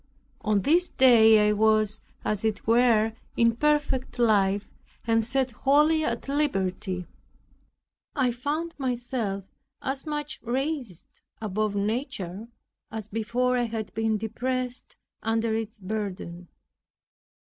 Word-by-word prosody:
On 210 Hz, -2 st, +1 dB
this 345 Hz, +6 st, +3 dB
day 225 Hz, -4 st, +6 dB
I -, -, +4 dB
was, 215 Hz, 0 st, +2 dB, 0.2 s
as 210 Hz, -1 st, -1 dB
it 220 Hz, -2 st, -1 dB
were, 225 Hz, -1 st, +4 dB, 0.2 s
in 230 Hz, -1 st, +4 dB
perfect 295 Hz, -2 st, 0 dB
life, 205 Hz, -4 st, +2 dB, 0.4 s
and 225 Hz, -1 st, +3 dB
set 260 Hz, +2 st, 0 dB
wholly 300 Hz, +6 st, +3 dB
at 235 Hz, -3 st, -2 dB
liberty. 190 Hz, -10 st, -1 dB, 1.1 s
I 260 Hz, -4 st, +2 dB
found 295 Hz, +7 st, -3 dB
myself 240 Hz, -6 st, -2 dB, 0.4 s
as 270 Hz, +2 st, -4 dB
much 295 Hz, 0 st, -4 dB
raised 255 Hz, -, -3 dB, 0.3 s
above 215 Hz, 0 st, -1 dB
nature, 205 Hz, -, -3 dB, 0.4 s
as 220 Hz, -1 st, -6 dB
before 235 Hz, +4 st, 0 dB
I 245 Hz, -1 st, +1 dB
had 225 Hz, -2 st, -5 dB
been 225 Hz, 0 st, 0 dB
depressed 250 Hz, +3 st, -3 dB, 0.3 s
under 225 Hz, 0 st, 0 dB
its 225 Hz, +1 st, -3 dB
burden. 185 Hz, -4 st, -5 dB
225 Hz, 115 wpm, -26 LUFS, 215-260 Hz, 1.1 s, day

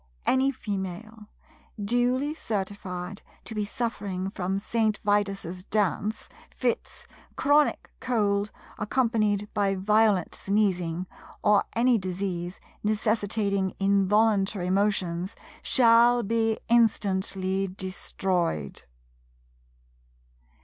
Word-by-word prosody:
Any 260 Hz, +1 st, +3 dB
Female, 210 Hz, -2 st, -5 dB, 0.5 s
duly 245 Hz, +7 st, +1 dB
certified 195 Hz, -, -4 dB, 0.2 s
to -, -, -6 dB
be 210 Hz, -1 st, -1 dB
suffering 200 Hz, -4 st, -3 dB
from 190 Hz, -1 st, -2 dB
St. 215 Hz, +1 st, 0 dB
Vitus's 195 Hz, -3 st, 0 dB
Dance, 210 Hz, +1 st, -1 dB, 0.2 s
fits, 245 Hz, -2 st, -3 dB, 0.3 s
chronic 290 Hz, +1 st, +2 dB
cold 210 Hz, -5 st, 0 dB, 0.3 s
accompanied 210 Hz, -3 st, +1 dB
by 200 Hz, -1 st, +1 dB
violent 210 Hz, -1 st, +2 dB
sneezing, 185 Hz, -4 st, 0 dB, 0.4 s
or 205 Hz, -1 st, +4 dB
any 240 Hz, 0 st, +4 dB
disease 180 Hz, -1 st, -4 dB, 0.2 s
necessitating 205 Hz, -2 st, 0 dB
involuntary 200 Hz, -1 st, +2 dB
motions, 190 Hz, -2 st, 0 dB, 0.3 s
shall 240 Hz, -1 st, +5 dB
be 225 Hz, +1 st, +1 dB
instantly 195 Hz, -4 st, +2 dB
destroyed. 185 Hz, -, -2 dB
205 Hz, 80 wpm, -27 LUFS, 190-225 Hz, 0.5 s, shall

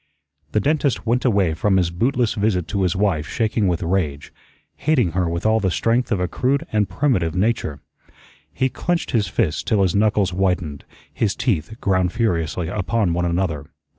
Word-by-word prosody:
The -, -, +3 dB
dentist 145 Hz, +2 st, 0 dB
went 120 Hz, +3 st, +1 dB
away 100 Hz, -9 st, +2 dB
from 95 Hz, +4 st, +1 dB
his 90 Hz, -2 st, +1 dB
bootless 120 Hz, +5 st, +1 dB
visit 100 Hz, -5 st, 0 dB
to 100 Hz, -, -1 dB
his 90 Hz, -1 st, +1 dB
wife 95 Hz, -6 st, 0 dB
shaking 110 Hz, -1 st, 0 dB
with 90 Hz, -1 st, 0 dB
rage, 80 Hz, -5 st, -2 dB, 0.4 s
hating 135 Hz, -, +2 dB
her 90 Hz, 0 st, 0 dB
with 85 Hz, +3 st, -3 dB
all 110 Hz, 0 st, +4 dB
the 95 Hz, -3 st, +1 dB
strength 115 Hz, +7 st, 0 dB
of 100 Hz, -, +1 dB
a 90 Hz, -, 0 dB
crude 140 Hz, -, 0 dB
and 105 Hz, -3 st, +1 dB
primitive 95 Hz, -, 0 dB
nature. 95 Hz, -7 st, -1 dB, 0.7 s
He 130 Hz, -, 0 dB
clenched 175 Hz, +6 st, -2 dB
his 110 Hz, -5 st, +1 dB
fists 85 Hz, -3 st, 0 dB
till 105 Hz, -4 st, +1 dB
his 90 Hz, -3 st, +1 dB
knuckles 105 Hz, -2 st, +2 dB
whitened, 90 Hz, -6 st, -1 dB, 0.3 s
his 105 Hz, -4 st, 0 dB
teeth 110 Hz, -, -2 dB
ground 95 Hz, -2 st, +1 dB
furiously 85 Hz, -7 st, -1 dB
upon 100 Hz, 0 st, 0 dB
one 90 Hz, +1 st, 0 dB
another. 85 Hz, -5 st, -1 dB
95 Hz, 175 wpm, -21 LUFS, 85-115 Hz, 0.7 s, all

